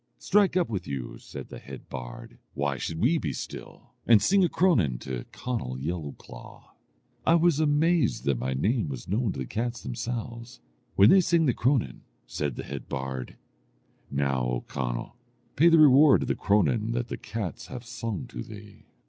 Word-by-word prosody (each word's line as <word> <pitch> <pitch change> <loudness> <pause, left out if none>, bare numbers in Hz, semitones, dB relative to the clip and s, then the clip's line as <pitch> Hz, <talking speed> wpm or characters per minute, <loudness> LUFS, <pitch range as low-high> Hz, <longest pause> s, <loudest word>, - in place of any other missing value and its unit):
'Strike 200 -3 +3
up 175 - +2
with 100 -5 -4
you,' 65 -3 -5
said - - -9
the - - -8
head 70 -1 -11
bard, - - -8 0.2
'why 70 -1 0
should 80 +5 -4
we 155 - +3
be - - -2
still? - - -8 0.2
and 115 -3 +7
sing 195 - +3
a 175 - +3
cronan 110 - +2
to 65 -2 -6
Conall 115 - -4
Yellowclaw.' 75 -4 -7 0.5
I 165 - +4
was 170 -2 +3
amazed 155 -2 +2
that 70 -3 +1
my 65 +2 -2
name 105 - 0
was 65 -3 -7
known 105 +3 0
to - - -9
the 65 - -3
cats 120 - -3
themselves, 120 0 -5 0.4
When 100 +3 +7
they - - +7
had 185 - +4
sung 170 -2 +3
the 125 - +3
cronan, 130 +1 0 0.2
said 65 +2 -3
the - - -5
head 70 -2 -7
bard, 65 -1 -4 0.7
'Now, 70 -2 0
O 60 0 -1
Conall, - - -4 0.4
pay 165 +5 +6
the 165 - +6
reward 145 -1 +7
of - - -5
the - - +1
cronan 105 +2 +1
that 120 0 -2
the - - -4
cats 110 -6 -5
have 125 -2 -8
sung 115 0 -4
to - - -6
thee.' 105 -2 -12
110 Hz, 180 wpm, -27 LUFS, -, 0.7 s, and